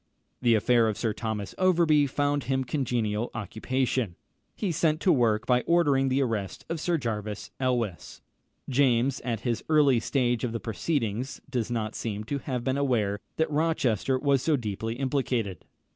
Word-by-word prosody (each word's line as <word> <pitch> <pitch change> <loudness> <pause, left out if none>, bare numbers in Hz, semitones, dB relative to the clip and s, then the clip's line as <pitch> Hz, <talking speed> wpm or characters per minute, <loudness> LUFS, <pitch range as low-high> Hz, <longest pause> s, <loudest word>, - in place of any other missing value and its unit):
The 120 -2 +4
affair 115 +1 +3
of 110 - -1
Sir 115 -3 -1
Thomas 110 -3 -4
Overbury 165 -6 +4
found 145 +1 0
him 130 0 0
congenial 120 -5 -1
occupation. 115 0 -1 0.4
He 200 -5 -1
set 160 -1 +1
to 185 - +4
work 115 -6 +2
by 125 -1 +3
ordering 145 -6 +3
the 135 +2 +2
arrest 110 -6 -3
of 165 -1 -2
Sir 170 +2 +1
Jervis 105 -6 -4
Elwes. 120 -8 -2 0.4
James, 130 -1 +2
at 115 -3 -3
this 120 -3 -1
early 145 -6 +5
stage 120 -1 0
of 120 -2 -1
the 115 - -2
proceedings, 120 0 -2
does 120 -4 -1
not 110 -2 -2
seem 105 -2 -4
to 140 +6 -3
have 125 -2 -3
been 130 +2 0
aware 110 -7 +1 0.2
that 160 -1 0
Rochester 140 -6 +1
was 140 -1 +2
so 155 +2 +2
deeply 110 -2 -3
implicated. 125 - -1
125 Hz, 160 wpm, -27 LUFS, 110-140 Hz, 0.4 s, early